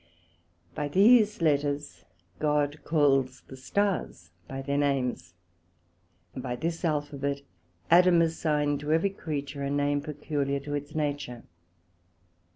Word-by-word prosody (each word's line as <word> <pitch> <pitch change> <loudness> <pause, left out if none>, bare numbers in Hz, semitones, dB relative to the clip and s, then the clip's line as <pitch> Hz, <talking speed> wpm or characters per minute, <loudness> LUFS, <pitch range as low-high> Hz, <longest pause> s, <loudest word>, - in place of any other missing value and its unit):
By 150 -2 -2
these 210 - +5
Letters 145 -1 0 0.3
God 150 -1 +1
calls 135 -4 +2
the 130 - -12
Stars 135 - -2 0.2
by 135 0 -6
their 140 +1 0
names; 125 - -1 1.0
and - - -6
by 125 -1 -3
this 165 +7 -3
Alphabet 145 -3 -2 0.5
Adam 175 0 +6
assigned 150 -3 0
to 150 +1 -3
every 170 +5 +2
creature 145 -6 -5
a 140 - -2
name 145 0 +1
peculiar 145 -2 -2
to 145 +1 -6
its 145 +1 -5
nature. 145 -5 -3
145 Hz, 120 wpm, -28 LUFS, 140-155 Hz, 1.0 s, Adam